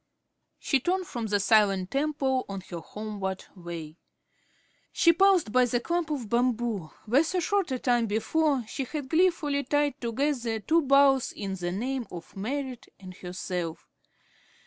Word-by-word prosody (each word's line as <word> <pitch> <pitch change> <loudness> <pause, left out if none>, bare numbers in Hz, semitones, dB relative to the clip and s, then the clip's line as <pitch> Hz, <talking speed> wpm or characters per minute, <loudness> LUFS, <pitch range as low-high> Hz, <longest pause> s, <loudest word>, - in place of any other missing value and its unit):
She 275 - +1
turned 365 +7 0
from 235 -7 -4
the 205 -1 +1
silent 200 -3 +3
temple 275 -2 0
on 195 -1 -5
her 170 - -4
homeward 200 +1 -5
way. 170 -3 -8 0.9
She 335 -1 +5
paused 375 - +4
by 250 +2 +5
the 245 0 0
clump 340 +5 -1
of 275 -7 -3
bamboo 235 -6 0 0.2
where 250 +8 +4
so 360 +3 -1
short 390 0 0
a 260 - 0
time 240 -2 +1
before 270 +5 +1
she 270 - -3
had 285 0 -5
gleefully 320 -5 +2
tied 290 0 0
together 235 -1 -1
two 325 +9 +2
boughs 275 -2 +4
in 195 -2 -5
the 175 -2 -3
name 245 +5 -2
of 170 -2 -10
Merrit 255 +4 -4
and 185 -2 -10
herself. 180 -2 -5
245 Hz, 150 wpm, -28 LUFS, 200-290 Hz, 0.9 s, She